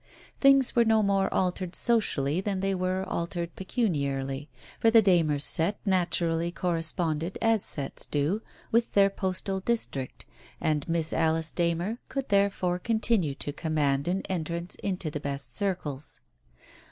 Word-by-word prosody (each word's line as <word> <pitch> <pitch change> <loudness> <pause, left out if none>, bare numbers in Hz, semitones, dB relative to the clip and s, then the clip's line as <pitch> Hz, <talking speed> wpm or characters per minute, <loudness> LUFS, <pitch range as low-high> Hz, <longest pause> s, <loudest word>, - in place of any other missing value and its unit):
Things 275 -2 +5
were 235 - +6
no 220 -1 +3
more 195 -1 +1
altered 180 -1 -1
socially 180 - +2
than 195 -1 -2
they 195 0 +1
were 185 0 -1
altered 170 0 -3
pecuniarily, 140 - -2 0.3
for 225 - +4
the 225 0 +7
Darners' 160 -7 +3
set 170 +6 +3
naturally 170 -3 +1
corre 175 -1 -1
sponded, 165 +1 0
as 225 -3 +2
sets 140 -2 -4
do, 150 +9 0 0.3
with 230 +1 +2
their 200 -1 +5
postal 190 0 -2
district, 190 - -2 0.3
and 150 0 -1
Miss 165 -1 +1
Alice 160 0 +1
Darner 175 +6 -1
could 275 -1 -4
therefore 200 -3 +1
continue 220 -8 +1
to 145 - -4
command 145 -3 0
an 185 +2 0
entrance 170 0 -4
into 185 -5 -2
the 150 - -4
best 140 -4 -5
circles. 155 -7 -3
175 Hz, 140 wpm, -28 LUFS, 155-200 Hz, 0.3 s, the